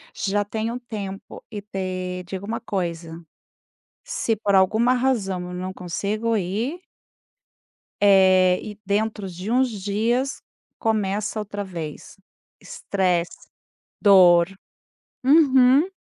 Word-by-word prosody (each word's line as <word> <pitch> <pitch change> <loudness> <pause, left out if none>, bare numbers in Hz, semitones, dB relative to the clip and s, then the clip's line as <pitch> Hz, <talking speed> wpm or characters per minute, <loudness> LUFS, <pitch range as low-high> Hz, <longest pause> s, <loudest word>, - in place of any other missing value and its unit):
Já 205 +1 0
tem 220 +2 -3
um 245 - -5
tempo 205 -5 -8
e 210 -2 -5
te 185 -2 -4
digo 190 +1 -6
uma 225 +2 -3
coisa, 170 -5 -4 0.8
se 225 - -1
por 205 -1 0
alguma 220 +6 +4
razão 235 -8 0
eu - - -7
não 185 +1 -4
consigo 205 +6 -2
ir 220 - -2 1.2
eh, 185 -2 +5
e 205 - -13
dentro 210 0 -1
de 180 +4 -6
uns 255 +1 +3
dias, 230 +7 -1 0.4
começa 215 -1 -1
outra 205 -1 -5
vez. 165 -6 -8 0.4
Estresse, 180 -3 -2 0.5
dor. 180 -4 +6 0.8
Uhum. 275 +2 +5
200 Hz, 110 wpm, -23 LUFS, 185-225 Hz, 1.2 s, dor